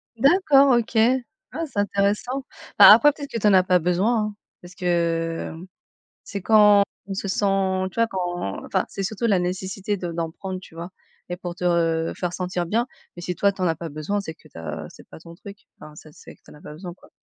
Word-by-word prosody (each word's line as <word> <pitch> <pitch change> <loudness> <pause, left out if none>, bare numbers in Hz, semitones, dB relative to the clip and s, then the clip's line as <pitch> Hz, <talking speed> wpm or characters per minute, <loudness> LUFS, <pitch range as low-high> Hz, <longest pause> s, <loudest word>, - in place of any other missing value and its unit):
D'accord, 280 0 +5
OK. 230 0 -6 0.6
Ah 330 - -4
c'est 230 -8 -5
intéressant! 205 +6 0 0.4
Bah - - +11
après 295 0 +7
peut-être 285 -2 -8
que 230 - -3
tu 210 - +2
en 200 - +5
as 185 -1 +6
pas 180 -1 +3
besoin, 185 +7 +1
hein, 210 -1 -6 0.3
parce 175 0 -13
que, 165 -2 -1
mmh, 175 +3 -11 0.6
c'est 200 -3 -6
quand 210 -1 +6 0.2
on 195 - -5
se 195 +1 -4
sent, 190 -1 0
tu - - -19
vois, 230 - +3
quand 175 - -4
enfin 190 - -1
c'est 195 - -5
surtout 215 +4 -3
la 195 -4 +3
nécessité 190 +3 -3
de 175 -2 -5
d'en 165 -1 -3
prendre, 190 +1 -6
tu 185 - -16
vois? 170 +2 -7 0.4
Et 175 - -4
pour 175 -2 -6
te 180 - -8
re 165 -2 +1
faire 180 -1 -3
sentir 180 -1 -3
bien, 230 +8 0 0.3
mais 175 - -9
si 180 0 -4
toi 200 +3 +2
tu 190 - -9
en 180 - +2
as 165 - 0
pas 165 +1 -7
besoin, 155 +8 -3
c'est 160 -5 -6
que 155 - -21
tu - - -15
as 80 -1 -6
c'est - - -17
pas - - -13
ton 170 0 -13
truc, 200 +2 -11 0.2
enfin 150 0 -12
ça, 155 - -14
c'est - - -14
que - - -36
tu - - -17
en - - -14
as 150 - -17
pas 150 - -10
besoin 175 +2 -8
quoi. - - -21
185 Hz, 240 wpm, -23 LUFS, 170-205 Hz, 0.6 s, Bah